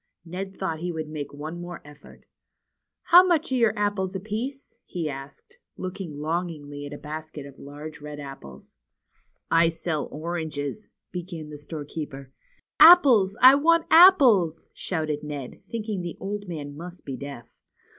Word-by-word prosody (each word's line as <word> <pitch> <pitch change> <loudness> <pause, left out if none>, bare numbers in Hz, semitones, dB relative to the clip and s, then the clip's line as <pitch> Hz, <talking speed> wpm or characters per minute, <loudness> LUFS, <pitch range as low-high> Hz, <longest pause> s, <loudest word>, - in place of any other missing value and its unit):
Ned 190 +3 -6
thought 165 -5 -3
he 175 +1 -3
would 160 -2 -5
make 145 -2 -6
one 155 +4 -7
more 175 -1 -7
effort. 150 0 -16 0.8
How 355 +1 +8
much 340 -5 +1
are - - +2
your 230 -4 +2
apples 205 -2 -1
apiece? 225 +8 -5
" - - -56
he 170 -3 -3
asked, 135 -1 -9 0.2
looking 185 -4 -6
longingly 150 -2 -4
at 145 - -9
a - - -6
basket 155 -1 -7
of 140 -1 -13
large 150 +2 -9
red 150 0 -8
apples. 70 - -11 0.7
I 165 0 +5
sell 165 -2 -3
oranges 160 +2 -5
" - - -61
— - - -58
began 170 -4 -7
the 150 - -9
storekeeper. 145 -3 -7 0.5
Apples! 265 - +7
I 260 +1 +11
want 325 +4 +3
apples! 255 - +6
" - - -45
shouted 155 -4 -3
Ned, 145 -4 -7
thinking 215 -4 -3
the 175 -1 -6
old 205 +1 -5
man 145 -4 -6
must 175 +3 -10
be 135 - -5
deaf. 140 -4 -9
165 Hz, 160 wpm, -25 LUFS, 145-200 Hz, 0.8 s, I